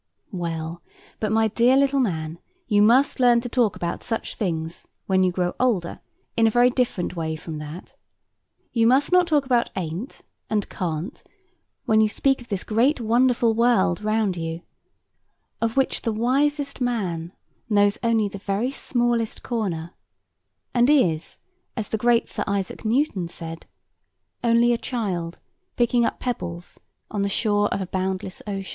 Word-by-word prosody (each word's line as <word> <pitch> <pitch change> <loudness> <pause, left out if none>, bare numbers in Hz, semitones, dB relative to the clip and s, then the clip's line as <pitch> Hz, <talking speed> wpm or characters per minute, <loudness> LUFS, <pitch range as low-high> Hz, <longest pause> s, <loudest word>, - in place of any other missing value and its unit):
Well, 170 -1 -4 0.4
but, 215 -1 -1
my 220 0 +3
dear 240 +5 +4
little 275 0 +3
man, 165 -8 -2 0.3
you 205 -7 +3
must 250 +7 +4
learn 245 -2 +5
to 245 - -5
talk 235 -4 +2
about 170 0 -3
such 225 - -3
things, 165 -4 -4 0.2
when 190 -1 +2
you 185 - +2
grow 180 0 -1
older, 210 -10 0 0.4
in 225 -1 +4
a - - +5
very 245 +2 +4
different 230 -8 -1
way 160 -2 -2
from 155 -1 -7
that. 150 +4 -9 0.8
You 230 -1 +3
must 265 +6 +3
not 360 -1 +5
talk 295 -4 +2
about 245 -3 +2
"ain't" 185 - -5 0.3
and 210 -2 0
"can't" 175 - -4 0.6
when 220 0 +4
you 215 - +3
speak 270 +4 +1
of 240 - -13
this 200 -4 -3
great 245 +7 +2
wonderful 235 0 +3
world 225 -5 +2
round 215 -3 +1
you, 165 0 -5 1.0
of 230 +2 -1
which 270 - +1
the 230 - -1
wisest 275 +5 0
man 185 -9 -2 0.4
knows 205 -1 +3
only 230 -3 +2
the 200 0 -8
very 205 +6 -1
smallest 240 -4 -1
corner, 180 -9 -3 0.8
and 245 +1 +4
is, 180 - +2 0.4
as 215 -3 -3
the 220 - -1
great 235 +1 +3
Sir - - -3
Isaac 200 +1 -2
Newton 220 - 0
said, 165 -1 -8 0.8
only 235 0 +4
a 235 - -1
child 185 -10 -3 0.4
picking 240 0 +2
up - - -2
pebbles 175 -8 -5 0.3
on 205 - -2
the 200 - 0
shore 205 0 +2
of 195 - -1
a - - -2
boundless 185 0 -3
ocean. 195 -2 -4
215 Hz, 160 wpm, -24 LUFS, 180-240 Hz, 1.0 s, learn